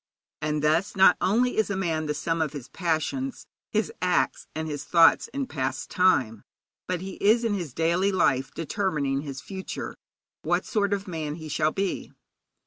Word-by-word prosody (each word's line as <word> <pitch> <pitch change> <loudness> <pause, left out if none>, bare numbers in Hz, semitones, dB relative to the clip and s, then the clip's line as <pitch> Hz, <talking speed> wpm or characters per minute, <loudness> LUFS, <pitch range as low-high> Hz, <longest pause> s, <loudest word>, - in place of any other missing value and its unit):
And 150 0 -1
thus 160 +7 +2
not 190 -1 +7
only 245 +6 +2
is 220 - +2
a 200 - -1
man 160 -4 -1
the 150 - -1
sum 165 +2 -1
of 155 -2 -1
his 140 -4 -8
passions, 180 - -2 0.2
his 215 -2 0
acts 180 0 +1
and 160 0 -3
his 145 -2 -4
thoughts, 165 -1 +5
in 275 +3 -3
past 135 - -3
time, 130 - +2 0.4
but 180 -1 -2
he 190 0 -7
is 220 +4 +5
in 225 -3 +1
his 175 -8 -3
daily 170 +7 +1
life 135 -8 +2
determining 150 -6 -1
his 140 -3 -6
future 190 -1 -6 0.5
what - - 0
sort 205 -3 0
of 200 -1 -1
man 155 -4 -3
he 160 -1 -8
shall 155 +1 +1
be. 195 +1 -2
170 Hz, 175 wpm, -26 LUFS, 150-195 Hz, 0.5 s, not